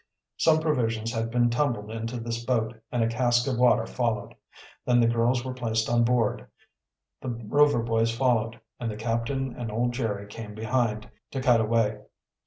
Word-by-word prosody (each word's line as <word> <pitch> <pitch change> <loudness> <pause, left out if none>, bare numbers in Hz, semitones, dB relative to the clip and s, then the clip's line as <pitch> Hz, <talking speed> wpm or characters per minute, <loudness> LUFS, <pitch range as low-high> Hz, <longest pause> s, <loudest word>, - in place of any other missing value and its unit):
Some 160 -1 +4
provisions 115 -7 0
had 115 0 -1
been 120 0 +2
tumbled 120 -5 -1
into 115 +2 -4
this 115 0 -4
boat, 120 -2 0 0.2
and 120 -2 +1
a - - +2
cask 120 +1 +2
of 125 -3 -1
water 125 -2 +4
followed. 115 -4 -2 0.5
Then 120 -1 +3
the 120 - +5
girls 120 +2 +1
were 130 - -3
placed 115 -3 -1
on 120 0 +4
board, 120 -2 +1 0.7
the 130 - -4
Rover 120 +3 +2
boys 115 0 +1
followed, 115 -1 0 0.2
and 120 - -2
the 105 - -5
captain 115 +4 -2
and 120 -4 -5
old 120 +3 0
Jerry 110 -5 -2
came 105 0 -9
behind, 110 -1 -1 0.2
to 135 - -4
cut 125 -3 +4
away. 110 -1 +1
115 Hz, 175 wpm, -27 LUFS, 115-125 Hz, 0.7 s, the